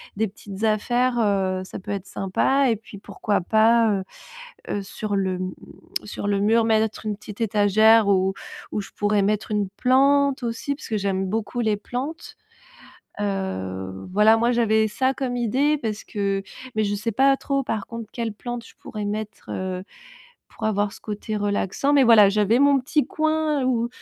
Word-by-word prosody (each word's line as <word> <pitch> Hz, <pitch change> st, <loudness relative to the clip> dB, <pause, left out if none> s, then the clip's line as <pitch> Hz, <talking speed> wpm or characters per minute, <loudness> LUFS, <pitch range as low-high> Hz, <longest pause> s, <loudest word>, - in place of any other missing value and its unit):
des 220 Hz, +2 st, 0 dB
petites 200 Hz, +1 st, -9 dB
affaires, 240 Hz, +3 st, +1 dB
heu. 190 Hz, -3 st, +1 dB
Ça 185 Hz, -, -8 dB
peut 190 Hz, -, -12 dB
être 200 Hz, -2 st, -3 dB
sympa 260 Hz, +9 st, +1 dB
et 230 Hz, -, +2 dB
puis, 215 Hz, -1 st, -12 dB
pourquoi 205 Hz, 0 st, -2 dB
pas, 225 Hz, +4 st, +4 dB
heu 195 Hz, -2 st, -1 dB, 0.7 s
heu, 205 Hz, -, -2 dB
sur 205 Hz, +1 st, -4 dB
le, 190 Hz, -2 st, 0 dB
mmh, 185 Hz, 0 st, -3 dB, 0.5 s
sur 205 Hz, -, -5 dB
le 200 Hz, -1 st, +1 dB
mur, 225 Hz, +3 st, +3 dB
mettre 220 Hz, -1 st, +1 dB
une 210 Hz, -1 st, -1 dB
petite 210 Hz, +1 st, -11 dB
étagère 215 Hz, +1 st, +4 dB
où 190 Hz, -1 st, +2 dB, 0.4 s
où -, -, -2 dB
je -, -, -12 dB
pourrais 205 Hz, -1 st, +1 dB
mettre 210 Hz, +2 st, 0 dB
une 205 Hz, -2 st, 0 dB
plante 275 Hz, +4 st, +3 dB
aussi? 235 Hz, +4 st, -2 dB
Parce 280 Hz, -, -10 dB
que 220 Hz, -, -1 dB
j'aime 195 Hz, -1 st, -1 dB
beaucoup 220 Hz, +4 st, -2 dB
les 215 Hz, -3 st, +1 dB
plantes. 270 Hz, +10 st, -6 dB, 0.8 s
Heu, 95 Hz, -, -4 dB
voilà, 210 Hz, +3 st, +5 dB
moi, 235 Hz, +2 st, +2 dB
j'avais 220 Hz, -2 st, +3 dB
ça 260 Hz, +5 st, 0 dB
comme 255 Hz, -2 st, -3 dB
idée 265 Hz, +6 st, +1 dB
parce 220 Hz, -6 st, -4 dB
que 200 Hz, -1 st, -2 dB, 0.3 s
mais 215 Hz, -, +2 dB
je 205 Hz, 0 st, 0 dB
sais 215 Hz, +3 st, -2 dB
pas 270 Hz, +5 st, +4 dB
trop, 275 Hz, 0 st, -1 dB
par 220 Hz, -5 st, -3 dB
contre, 230 Hz, -2 st, -8 dB
quelle 230 Hz, -3 st, -3 dB
plante 240 Hz, +2 st, -6 dB
je -, -, -15 dB
pourrais 210 Hz, -1 st, -6 dB
mettre, 210 Hz, 0 st, -5 dB
heu, 185 Hz, -1 st, -4 dB, 0.6 s
pour 220 Hz, -, -7 dB
avoir 205 Hz, -1 st, +1 dB
ce -, -, -12 dB
côté 215 Hz, 0 st, -4 dB
relaxant. 205 Hz, +6 st, 0 dB
Mais 280 Hz, -2 st, +6 dB
voilà, 225 Hz, -4 st, +7 dB
j'avais 210 Hz, +3 st, +2 dB
mon 280 Hz, 0 st, +5 dB
petit 290 Hz, +3 st, 0 dB
coin 310 Hz, -2 st, 0 dB
où 235 Hz, -2 st, +1 dB
215 Hz, 180 wpm, -23 LUFS, 200-240 Hz, 0.8 s, voilà